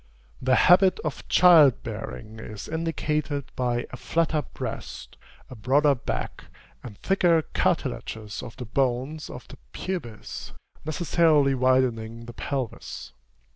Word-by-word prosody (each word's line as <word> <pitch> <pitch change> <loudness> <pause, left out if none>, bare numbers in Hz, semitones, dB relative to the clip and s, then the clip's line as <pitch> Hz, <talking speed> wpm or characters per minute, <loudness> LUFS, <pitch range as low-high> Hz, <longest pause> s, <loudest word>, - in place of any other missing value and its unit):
The 130 0 +3
habit 185 0 +5
of 155 -3 -5
child 160 -8 +6
bearing 110 -1 -7
is 105 -2 -8
indicated 155 -3 -2
by 120 -1 -1
a - - -7
flatter 160 -2 0
breast, - - -7 0.3
a - - -10
broader 140 +6 +3
back, 120 - -5 0.4
and 105 -5 -10
thicker 175 -4 +2
cartilages 110 -1 -2
of 120 - -10
the 125 - -6
bones 130 +5 -1
of - - -9
the - - -12 0.2
pubis, 140 - -6 0.3
necessarily 155 -3 +3
widening 120 -3 +1
the 120 - -9
pelvis. 130 -1 -5
135 Hz, 120 wpm, -26 LUFS, 120-160 Hz, 0.4 s, child